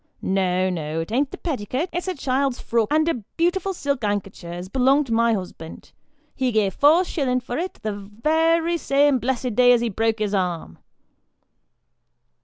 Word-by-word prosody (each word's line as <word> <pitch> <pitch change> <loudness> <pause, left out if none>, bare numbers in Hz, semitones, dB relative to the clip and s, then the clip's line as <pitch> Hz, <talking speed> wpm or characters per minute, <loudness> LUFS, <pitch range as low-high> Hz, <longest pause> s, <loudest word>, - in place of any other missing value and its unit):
No, 185 -1 +1
no; 160 -2 -3
it 165 - -7
an't 265 +4 +1
the - - -8
petticut; 270 - -3
it's 355 +2 -3
a 370 - -2
child's 270 -1 -1
frock 230 -2 0
and 310 +1 +3
a 335 - +2 0.2
beautiful 355 +3 +1
silk 280 -7 -2
ankecher, 195 -4 -3
as 175 +1 -6
belongs 265 +7 +3
to 235 - -3
my 230 0 +3
husband. 180 -4 -8 0.4
He 260 -2 -1
gave 210 -4 +1
four 310 - +5
shillin' 260 -7 0
for 245 +2 -5
it, 365 +2 -4
the 205 -2 -5 0.2
worry 330 +2 +2
same 280 -2 +3
blessed 250 0 -2
day 245 +2 +5
as 240 - +2
he 235 - 0
broke 225 +2 0
his 210 -2 -2
arm." 175 - -2
245 Hz, 175 wpm, -23 LUFS, 200-290 Hz, 0.4 s, four